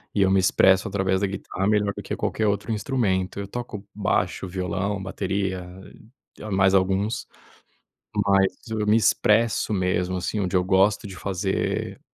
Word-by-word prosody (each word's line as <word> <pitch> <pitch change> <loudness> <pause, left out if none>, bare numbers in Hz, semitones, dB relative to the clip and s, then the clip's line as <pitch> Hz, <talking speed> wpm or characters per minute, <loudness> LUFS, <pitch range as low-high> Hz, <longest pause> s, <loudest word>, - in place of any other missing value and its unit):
e 100 - +2
eu 95 - +3
me 95 - +4
expresso 95 +2 +4
através 95 -1 0
da 100 - +2
guitarra 95 0 -3
melhor 105 -1 +2
do - - -7
que - - -4
qualquer 110 - -1
outro 100 +2 -1
instrumento. 105 -5 -1
Eu 100 - -5
toco 105 -2 -6
baixo, 100 -1 -1
violão, 95 +2 -2
bateria 95 -1 -2 0.7
e - - -11
mais 95 0 +3
alguns, 95 +4 0 1.0
mas 100 -1 +4 0.2
eu 110 -1 -1
me 105 +1 +5
expresso 110 0 +2
mesmo, 90 -1 0
assim, 90 +4 -2
onde 95 -1 0
eu 90 - +2
gosto 95 +3 +2
de 95 - -8
fazer 95 0 -2
95 Hz, 160 wpm, -24 LUFS, 95-105 Hz, 1.0 s, me